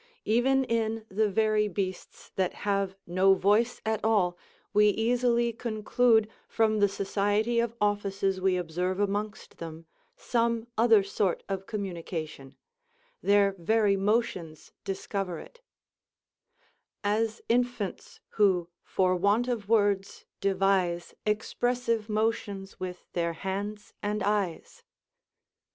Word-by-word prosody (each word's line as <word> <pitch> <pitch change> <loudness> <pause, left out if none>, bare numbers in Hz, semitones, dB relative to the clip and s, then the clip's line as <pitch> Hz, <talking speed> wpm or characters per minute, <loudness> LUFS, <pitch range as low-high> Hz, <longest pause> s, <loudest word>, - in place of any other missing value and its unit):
Even 265 +4 +3
in 225 -2 -1
the 210 +2 +1
very 215 +1 +2
beasts 185 -1 -5
that 185 -2 0
have 195 -2 0
no 185 +2 +4
voice 210 +6 +2
at 220 -1 -1
all, 200 -5 +2 0.4
we 210 0 +6
easily 235 +2 +1
conclude, 225 0 +2 0.2
from 215 -1 +1
the 205 0 +4
society 205 +4 0
of 235 0 -1
offices 200 -2 0
we 185 -1 +2
observe 180 +2 -2
amongst 205 +1 -3
them, 165 0 -8 0.3
some 230 -1 0
other 225 -3 +5
sort 195 -2 -1
of 195 -1 -4
communication: 170 -8 -5 0.7
their 200 -1 +4
very 210 +3 +3
motions 195 -6 -1
discover 195 -2 -3
it: 480 - -13 1.4
"As 215 +2 0
infants 240 -4 -1
who, 185 -5 +2
for 185 -1 +1
want 205 +7 +2
of 225 -5 -3
words, 205 -3 +1
devise 190 -3 +1
Expressive 230 +1 0
motions 210 -3 -2
with 180 -1 -6
their 170 -1 0
hands 200 +4 -5
and 210 0 -1
eyes." 205 - -2
205 Hz, 110 wpm, -28 LUFS, 190-225 Hz, 1.4 s, we